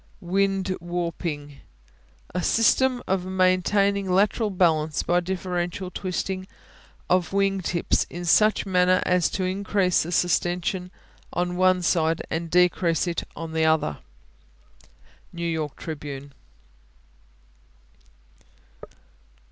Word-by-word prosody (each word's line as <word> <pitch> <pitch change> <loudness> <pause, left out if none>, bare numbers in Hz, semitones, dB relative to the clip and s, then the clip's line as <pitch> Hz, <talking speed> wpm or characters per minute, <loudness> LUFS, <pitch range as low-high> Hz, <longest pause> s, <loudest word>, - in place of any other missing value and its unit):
Wing 195 +1 0
Warping 170 -4 -4 0.7
A 180 - -1
system 245 +5 +2
of 190 -1 0
maintaining 190 +2 +2
lateral 205 +4 +2
balance 160 -5 +1
by 175 +1 +2
differential 180 0 -3
twisting 185 +1 -3 0.6
of 180 0 +1
wing 195 -1 +1
tips 170 -1 0
in 175 +1 -6
such 215 +6 +4
manner 185 -1 +3
as 180 -2 +2
to 190 - -3
increase 190 0 +1
the 165 - -4
sustension 180 +1 0 0.4
on 175 0 -1
one 185 0 +3
side 165 -1 +1
and 165 +1 -2
decrease 175 -1 +2
it 175 -1 -3
on 165 -1 -6
the 160 0 +2
other. 160 - +1 1.3
New 170 0 -5
York 160 -3 -3
Tribune. 145 -3 -7
180 Hz, 105 wpm, -24 LUFS, 170-190 Hz, 1.3 s, such